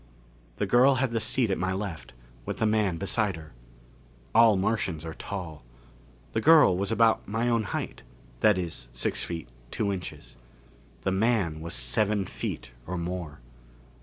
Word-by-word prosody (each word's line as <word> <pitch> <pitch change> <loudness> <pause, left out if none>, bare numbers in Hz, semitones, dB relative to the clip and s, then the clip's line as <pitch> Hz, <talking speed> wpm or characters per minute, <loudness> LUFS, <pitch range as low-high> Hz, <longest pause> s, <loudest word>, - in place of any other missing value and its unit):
The - - -1
girl 130 +3 +5
had 130 -1 0
the 115 - 0
seat 110 0 0
at - - 0
my 95 +1 0
left, 95 -8 -5 0.3
with - - -4
the - - +1
man 105 -5 +2
beside 100 +1 0
her. 80 -1 -12 0.8
All 110 -2 +6
Martians 95 -5 -1
are 80 - -5
tall. 85 -8 -6 0.7
The 110 - 0
girl 155 - +7
was 100 +3 -1
about 115 0 +3
my 115 +3 -1
own 115 -3 +2
height. - - -4 0.4
That 105 -3 +4
is, 85 -9 -4
six - - -2
feet, 85 -5 -5 0.2
two 100 -2 -1
inches. 90 -10 -8 0.6
The 95 - 0
man 95 -6 +1
was 85 -3 -5
seven 100 - +1
feet 65 - -5 0.2
or 90 +1 -3
more. 85 -4 -5
100 Hz, 160 wpm, -27 LUFS, 85-110 Hz, 0.8 s, girl